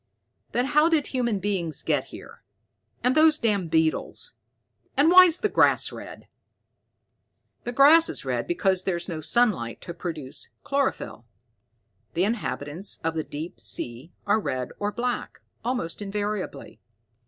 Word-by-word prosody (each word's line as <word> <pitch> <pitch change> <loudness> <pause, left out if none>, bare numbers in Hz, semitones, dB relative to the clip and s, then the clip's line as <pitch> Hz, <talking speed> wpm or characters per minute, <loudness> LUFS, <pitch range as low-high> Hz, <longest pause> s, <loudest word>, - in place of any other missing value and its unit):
"Then 245 - +1
how 300 +3 +4
did 315 -4 +2
human 240 -5 -1
beings 185 -5 -2
get - - 0
here, - - -12 0.6
and 250 - +3
those 310 +1 +5
damn 205 - 0
beetles? 160 - 0 0.6
And 295 +4 +5
why's 365 -2 +8
the 425 - +3
grass - - +3
red?" - - -10 1.4
"The 240 - -2
grass 300 +6 +6
is - - -5
red - - -2
because 195 - +1
there's 175 -3 -1
no 165 -4 -5
sunlight 180 - +1
to 170 - -7
produce 160 -6 -6
chlorophyll. 275 - -2 0.9
The 175 - +2
inhabitants 195 -5 -3
of 165 0 0
the 160 -1 -2
deep 155 +4 -7
sea 120 +7 -1
are 210 +1 +3
red 130 - -3
or 205 0 -1
black, 245 +2 -3 0.2
almost 230 -8 -3
invariably. 205 -6 -4
205 Hz, 135 wpm, -25 LUFS, 165-260 Hz, 1.4 s, why's